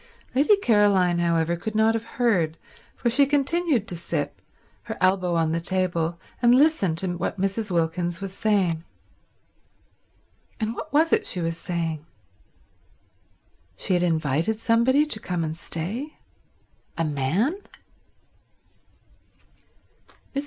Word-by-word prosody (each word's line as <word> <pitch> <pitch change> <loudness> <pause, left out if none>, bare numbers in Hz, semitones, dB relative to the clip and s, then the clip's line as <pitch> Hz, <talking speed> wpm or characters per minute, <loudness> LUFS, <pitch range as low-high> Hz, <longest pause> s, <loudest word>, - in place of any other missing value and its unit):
Lady 285 +11 +5
Caroline, 205 - +3
however, 170 0 +1
could 215 +5 -5
not 220 +1 +4
have 225 0 -2
heard, 180 -10 +1 0.4
for - - -3
she 270 +4 +4
continued 290 - +1
to 180 - -4
sip, 165 -3 -3 0.4
her - - -5
elbow 185 -1 +2
on 165 -1 +1
the 165 - 0
table, 170 -2 0 0.2
and 240 0 +6
listen 265 - +3
to 175 +2 -2
what 185 - -3
Mrs. 195 +3 -1
Wilkins 170 0 -1
was 195 -1 -6
saying. 190 -7 +1 1.8
And 220 0 -1
what 310 +6 -7
was 315 +3 +3
it - - +2
she 180 - -1
was 165 -1 -1
saying? 165 -3 -3 1.7
She 185 - -1
had 175 - +2
invited 165 +4 0
somebody 235 +6 +3
to 260 -8 -2
come 180 -4 -3
and 155 0 -3
stay? 200 - -5 0.8
A 165 - 0
man? 155 - 0
185 Hz, 125 wpm, -24 LUFS, 165-230 Hz, 1.8 s, and